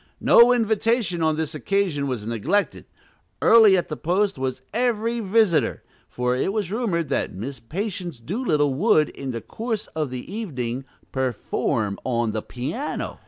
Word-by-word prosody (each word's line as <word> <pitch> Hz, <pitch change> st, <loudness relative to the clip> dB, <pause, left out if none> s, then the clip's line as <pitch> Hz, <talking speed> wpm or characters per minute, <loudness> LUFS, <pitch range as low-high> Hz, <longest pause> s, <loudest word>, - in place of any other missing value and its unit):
No 235 Hz, +1 st, +7 dB
invitation 225 Hz, -5 st, +1 dB
on 160 Hz, -1 st, +2 dB
this 160 Hz, 0 st, -3 dB
occasion 165 Hz, -4 st, 0 dB
was 125 Hz, -6 st, -3 dB
neglected; 115 Hz, -, -1 dB, 0.5 s
early 220 Hz, -4 st, +7 dB
at 175 Hz, -, -1 dB
the 155 Hz, -, -4 dB
post 190 Hz, +6 st, 0 dB
was 130 Hz, -1 st, -3 dB
every 235 Hz, 0 st, 0 dB
visitor, 210 Hz, -5 st, +2 dB, 0.3 s
for 125 Hz, 0 st, -1 dB
it 130 Hz, -, 0 dB
was 200 Hz, -4 st, -2 dB
rumored 200 Hz, -8 st, -1 dB
that 135 Hz, -, -1 dB
Miss 125 Hz, +7 st, -6 dB
Patience 175 Hz, -, -4 dB
Doolittle 150 Hz, -, 0 dB
would, 155 Hz, -, +3 dB
in 135 Hz, -, -7 dB
the 115 Hz, -2 st, -4 dB
course 225 Hz, -2 st, -4 dB
of 155 Hz, -3 st, -1 dB
the 125 Hz, -1 st, -6 dB
evening, 135 Hz, -, -4 dB, 0.3 s
"perform 115 Hz, -5 st, -1 dB
on 120 Hz, -3 st, 0 dB
the 110 Hz, -, -2 dB
piano." 150 Hz, -, -4 dB
165 Hz, 150 wpm, -23 LUFS, 130-215 Hz, 0.5 s, No